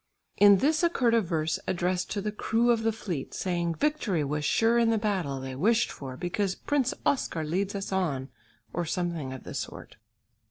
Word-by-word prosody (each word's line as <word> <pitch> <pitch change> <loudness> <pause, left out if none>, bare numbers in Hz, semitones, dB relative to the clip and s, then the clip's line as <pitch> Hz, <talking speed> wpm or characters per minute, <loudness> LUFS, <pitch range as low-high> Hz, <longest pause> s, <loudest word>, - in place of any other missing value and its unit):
In 205 -1 +8
this 305 +9 +2
occurred 265 -9 +2
a 230 - +5
verse 160 -4 -1
addressed 180 0 0
to 205 - -2
the 210 +1 -2
crew 225 +3 +2
of 230 -1 +2
the 225 0 +2
fleet, 185 -10 -5
saying 175 -2 -1
victory 260 - 0
was 150 +1 -2
sure 230 +9 +3
in 230 -1 +3
the 225 - +3
battle 190 -11 -1
they 130 0 -6
wished 220 - +2
for 130 -2 -8
"because 190 +3 -1
Prince 275 -4 0
Oscar 170 - 0
leads 190 +6 -1
us 195 0 -4
on," 150 -9 -1 0.4
or 175 - -1
something 170 -4 -2
of 130 - -8
the - - -8
sort. - - -6
190 Hz, 190 wpm, -28 LUFS, 160-225 Hz, 0.4 s, In